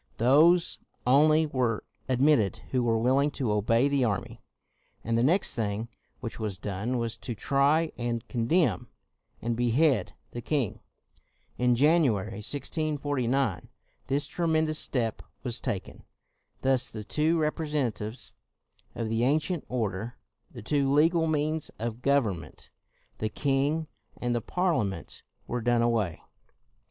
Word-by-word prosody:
Those 155 +9 +4 0.3
only 155 +5 +5
were 125 -7 -1 0.3
admitted 130 - +3
who 130 - +2
were 115 -2 +2
will 125 +4 +3
ing 145 +1 +2
to 125 -6 0
obey 115 +5 +3
the 140 -2 +1
army. 100 -5 -2 0.6
And 115 +1 0
the 115 - +3
next 170 +10 +2
thing 110 0 -2 0.3
which 115 -3 -6
was 105 -4 -3
done 105 +6 -3
was 115 -2 -3
to 120 - -5
try, 140 +8 +2
and 120 -1 -2
condemn, 125 +1 +1 0.6
and 115 0 0
behead 120 +2 +2 0.2
the 120 - -6
king. 130 -3 -1 0.8
In 125 0 +3
January 120 - +2
1649, 140 - -1 0.4
this 140 +2 +1
tremendous 160 -1 +1
step 115 -5 0 0.2
was 120 -3 -2
taken. 105 -8 -4 0.6
Thus 130 -1 +2
the 110 -1 -7
two 155 +9 +1
representatives 150 -8 -2 0.6
of 115 - -2
the 115 +1 0
ancient 155 +5 +1
order, 110 -2 -3 0.3
the - - -10
two 140 +2 +1
legal 160 +3 +4
means 155 0 0
of 115 +1 -4
government, 110 - -1 0.5
the 110 - -1
king 145 +5 0 0.3
and 120 0 -1
the 120 - 0
Parliament 110 - -1 0.2
were 120 0 -3
done 120 0 +2
away. 110 -8 0
125 Hz, 130 wpm, -28 LUFS, 115-150 Hz, 0.8 s, only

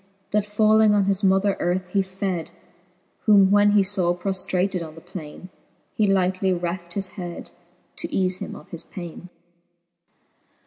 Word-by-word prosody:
That 210 0 +1
falling 215 0 +4
on 205 - +3
his 195 +1 0
mother 195 +1 +3
earth, 180 +1 0
he 195 - +2
fed: 190 -3 -3 0.8
Whom 200 -2 +6
when 205 0 +5
he 205 -1 +5
faw 185 -3 +1
proftratad 185 0 -1
on 155 -2 -8
the - - -10
plaine, 180 0 -9 0.4
He 215 - +2
lightly 190 0 +1
reft 175 -1 -3
his 195 -2 -2
head, 175 -4 -8 0.5
to - - -4
eafe 185 -1 0
him - - -6
o£ - - -12
his 170 -1 -6
paine. 175 -1 -9
190 Hz, 150 wpm, -23 LUFS, 180-200 Hz, 0.8 s, Whom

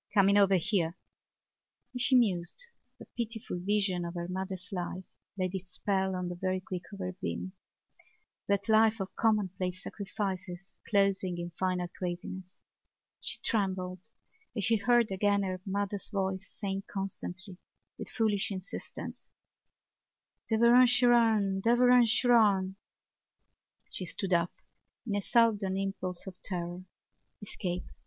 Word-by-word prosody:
coming 200 0 +6
over 200 -1 +5
here!" 180 -2 0 1.0
As 250 - -3
she 260 +1 +4
mused 195 - +1 0.3
the - - -11
pitiful 225 -5 -3
vision 195 -1 +1
of 170 +1 -5
her 170 0 -3
mother's 190 0 -4
life 185 0 -4 0.3
laid 185 -1 -1
its 185 -1 -6
spell 190 0 0
on 180 -1 -2
the 175 - -3
very 185 +1 -1
quick 185 -1 -6
of 200 - -8
her 185 -1 -4
being—that 190 +1 -6
life 220 0 +4
of 195 0 -5
commonplace 190 -4 0
sacrifices 195 -2 -5 0.2
closing 195 -3 +2
in 175 0 -5
final 180 +1 -1
craziness. 180 +1 -6 0.6
She - - -3
trembled 190 -2 -1 0.5
as 210 - 0
she 225 +2 +4
heard 240 0 +3
again 200 +1 +2
her 185 -1 -3
mother's 200 0 -2
voice 190 -2 -2
saying 195 -1 -4
constantly 190 -1 -5 0.4
with - - -6
foolish 215 -3 +1
insistence: 190 -1 -7 1.2
"Derevaun 235 +3 +6
Seraun! 230 -5 +4
Derevaun 245 +2 +5
Seraun!" 215 -5 +4 1.2
She 185 - -4
stood 190 +2 -3
up 170 0 +2 0.5
in 215 - -2
a 205 - 0
sudden 205 -4 +3
impulse 190 -2 -3
of 190 -2 -10
terror. 175 -1 -4 0.5
Escape! 180 -3 -4
195 Hz, 125 wpm, -30 LUFS, 185-210 Hz, 1.2 s, coming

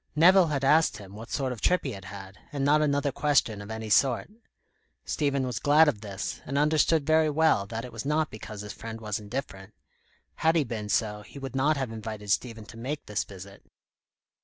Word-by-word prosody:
Nevill 180 +3 +6
had 140 -3 -1
asked 150 -4 +4
him 100 -2 -11
what 110 +2 -9
sort 135 -3 -1
of 120 - -6
trip 180 - +3
he 135 - -3
had 95 -3 -9
had, 95 0 -10
and 140 -2 -1
not 150 +2 +4
another 145 -1 +1
question 135 -7 +1
of 100 - -9
any 110 -1 -5
sort. 130 - +3 0.7
Stephen 140 -3 0
was 125 -2 -3
glad 150 +2 +5
of 115 -9 0
this, 100 -2 -5
and 140 - -3
understood 150 +1 +3
very 155 0 +4
well 150 -10 +2
that 115 +3 -5
it 125 - -10
was 115 - -5
not 155 +2 0
because 105 -1 -8
his 105 0 -7
friend 115 0 -7
was 105 -2 -3
indifferent. 105 -3 -6 0.6
Had 160 +1 +3
he 160 - +4
been 110 -4 -5
so, 105 -1 0
he 105 - -13
would 135 -1 -6
not 145 +3 +2
have 135 -4 -2
invited 110 -2 -5
Stephen 110 +1 -1
to 115 - -12
make 135 +6 -4
this 105 0 -1
visit. 100 0 -12
125 Hz, 210 wpm, -27 LUFS, 105-145 Hz, 0.7 s, Nevill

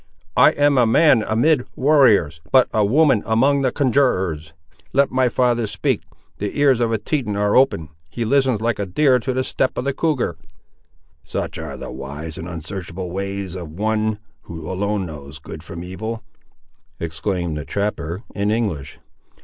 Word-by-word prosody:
I - - +7
am 145 -2 +3
a 120 - +4
man 135 +1 +5
amid 125 +6 +2
warriors, 120 - +4
but 130 -1 +6
a 110 - +3
woman 135 +1 +4
among 135 +6 +2
the 130 -2 +1
conjurors. 95 - +1 0.4
Let 140 +1 +3
my 130 -1 +2
father 120 -2 +1
speak: 100 -2 -1 0.4
the 105 +7 -3
ears 135 -4 +4
of 120 -1 +1
the 115 - +1
Teton 110 -1 -2
are 105 0 +1
open. 130 - +3 0.2
He 115 +8 -3
listens 130 -2 +2
like 115 -2 0
a 100 - -2
deer 130 +6 +3
to 130 - -2
the 130 +1 0
step 130 - -1
of - - -1
the 140 - 0
cougar." 135 - -1 0.9
"Such - - -4
are - - -6
the - - -7
wise 70 +6 -7
and 85 - -6
uns'archable 90 +1 -6
ways 100 -1 -4
of 90 -4 -6
One 110 +5 -1 0.3
who 80 -2 -8
alone 100 +1 -1
knows 75 -2 -9
good - - -9
from 85 +1 -8
evil!" 110 +5 -5 0.8
exclaimed 85 +1 -2
the 75 - -4
trapper, 100 - -3
in 100 0 -1
English. 100 -11 -2
105 Hz, 165 wpm, -21 LUFS, 90-130 Hz, 0.9 s, I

